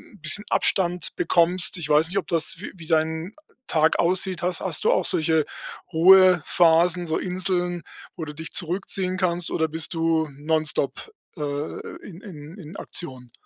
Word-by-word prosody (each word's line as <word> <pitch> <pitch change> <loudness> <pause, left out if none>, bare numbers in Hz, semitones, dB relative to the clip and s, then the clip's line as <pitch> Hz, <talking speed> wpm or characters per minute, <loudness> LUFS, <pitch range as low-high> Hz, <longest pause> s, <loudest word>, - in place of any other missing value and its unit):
'n - - -20
bisschen 160 +7 +2
Abstand 180 -3 +2
bekommst. 175 +2 +3
Ich 160 -4 -6
weiß 150 +2 +3
nicht, 195 - -4
ob - - -9
das 165 -3 +2
wie 205 - -8
wie 165 -3 -13
dein 160 +3 -1 0.3
Tag 160 0 +1
aussieht, 185 +1 +2
hast 180 -1 -2
hast 180 -6 0
du - - +4
auch - - 0
solche 160 -1 +1 0.5
Ruhephasen, 175 -1 +4
so 160 - -1
Inseln, 180 -1 -2 0.3
wo 165 - -6
du 150 - -9
dich 160 +1 -8
zurückziehen 185 +1 -2
kannst, 175 -2 -1
oder 160 - 0
bist 160 +2 -2
du 165 -1 0
non-stop, 155 - -1 0.3
äh, - - -8 0.7
in 180 -1 -12
in 160 -2 -12
in 170 -2 -12
Aktion? 130 -7 -4
170 Hz, 160 wpm, -23 LUFS, 160-180 Hz, 0.7 s, du